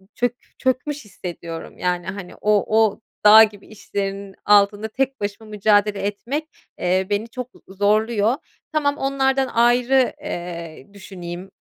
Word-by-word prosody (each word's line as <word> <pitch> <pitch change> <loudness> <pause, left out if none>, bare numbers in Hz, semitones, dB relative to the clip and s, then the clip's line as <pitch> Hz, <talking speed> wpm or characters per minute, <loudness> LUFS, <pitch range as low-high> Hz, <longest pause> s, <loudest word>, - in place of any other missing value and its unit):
çök 245 0 0 0.2
çökmüş 260 +1 -1
hissediyorum, 170 -4 -8
yani, 180 -1 -1
hani, 185 -1 -6
o 210 +1 +2
o 210 0 -3 0.2
dağ 215 +1 +10
gibi 210 -2 -3
işlerin 200 -2 -5
altında 205 +1 +4
tek 270 +4 -2
başıma 205 +2 -5
mücadele 210 -1 +2
etmek, 235 +10 -3 0.3
eee, 185 +1 +1
beni 205 +2 -1
çok 250 +1 -6 0.2
z 190 - -14
zorluyor. 215 +2 +2 0.4
Tamam 290 -2 +1
onlardan 270 -1 +1
ayrı, 245 +2 +3
eee, 170 - -6
düşüneyim, 185 -1 -8
210 Hz, 130 wpm, -22 LUFS, 195-245 Hz, 0.4 s, dağ